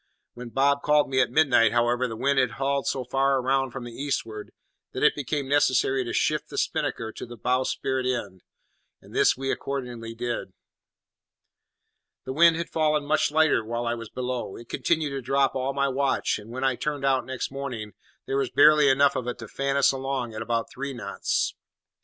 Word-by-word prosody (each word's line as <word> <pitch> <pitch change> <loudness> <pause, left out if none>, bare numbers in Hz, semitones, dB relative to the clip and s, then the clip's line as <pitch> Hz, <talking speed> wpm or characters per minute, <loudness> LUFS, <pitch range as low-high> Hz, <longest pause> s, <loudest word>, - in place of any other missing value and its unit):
When 125 0 -8
Bob 140 +3 +2
called 150 -2 +2
me 130 0 +3
at 125 - +1
midnight, 125 -6 +4
however, 120 +1 +2
the 115 - -6
wind 140 +4 +1
had 130 0 +1
hauled 135 0 -1
so 130 - -1
far 135 +2 +1
round 135 0 0
from 130 0 -6
the 120 -1 -8
eastward 115 -6 -4 0.4
that - - -3
it - - +6
became 145 0 -3
necessary 135 -2 +2
to 120 - -5
shift - - 0
the - - -8
spinnaker 110 -1 -1
to - - -9
the 120 0 -9
bowsprit 130 +2 -1
end; 100 -8 -3 0.6
and - - -17
this - - +3
we 135 0 -2
accordingly 120 -4 -5
did. 120 -5 -4 1.7
The 130 - -4
wind 170 +3 +6
had 170 0 -4
fallen 155 -2 +1
much 155 +1 +2
lighter 155 -6 +3
while 120 +2 -3
I 120 - 0
was 115 -2 -7
below, 125 -5 -4
it 115 - -12
continued 155 -3 0
to 135 -1 -4
drop 135 +2 +1
all 130 +1 -1
my 140 0 0
watch, 135 -3 0
and 105 +1 -13
when 130 +3 -5
I 130 -2 +1
turned 145 -2 -3
out 135 -1 +2
next 130 0 -4
morning 125 -7 -5 0.3
there 135 - -1
was 135 -2 0
barely 150 +1 +6
enough 140 +1 +4
of 125 - -3
it 125 - -3
to 115 - -9
fan 140 +4 -1
us 140 - +5
along 135 -3 -3
at 110 - -5
about 115 0 -2
three 140 +1 -5
knots. 105 -5 -2
130 Hz, 195 wpm, -26 LUFS, 120-140 Hz, 1.7 s, it